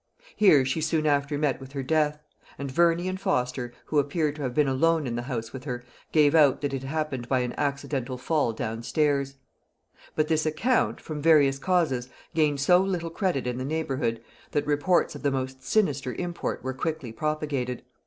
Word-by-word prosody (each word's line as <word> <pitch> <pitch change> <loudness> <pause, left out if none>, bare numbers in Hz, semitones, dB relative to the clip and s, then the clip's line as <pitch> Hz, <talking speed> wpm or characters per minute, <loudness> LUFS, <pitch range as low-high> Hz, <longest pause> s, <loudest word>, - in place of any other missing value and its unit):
Here 150 -11 +5
she 130 +5 -1
soon 160 0 0
after 145 0 +1
met 145 -4 0
with 135 +1 -11
her 135 -1 -3
death; 150 +1 +1 0.4
and 140 -1 -5
Verney 170 +4 +3
and 185 +1 -3
Foster, 125 -5 -1
who 150 - +1
appear 150 +2 0
to 150 +1 -9
have 130 -3 -3
been 150 -2 +3
alone 160 +4 +2
in 120 -2 -3
the 120 - -2
house 120 -3 -5
with 130 0 -8
her, 125 -3 -4 0.3
gave 150 -2 +4
out 150 -5 +5
that 145 -1 -2
it 135 - -2
happened 135 -3 -3
by 130 -2 +2
an 125 -1 -2
accidental 140 -2 -2
fall 145 -1 +1
down 110 0 -4
stairs. 140 +1 0 0.8
But 155 0 +1
this 155 -1 +1
account, 225 +12 +1
from 150 -2 -6
various 145 -4 +5
causes, 140 -8 +1 0.2
gained 150 -3 +2
so 180 +6 +5
little 180 -3 -1
credit 175 -8 -1
in 125 0 -2
the - - -3
neighbourhood, 135 -6 -2 0.3
that 145 - +1
reports 150 +5 +2
of - - -9
the 145 - +2
most 130 -1 -3
sinister 140 - 0
import 175 -1 -3
were 130 0 -2
quickly 150 -2 -3
propagated. 145 -2 -2
145 Hz, 190 wpm, -26 LUFS, 130-155 Hz, 0.8 s, Here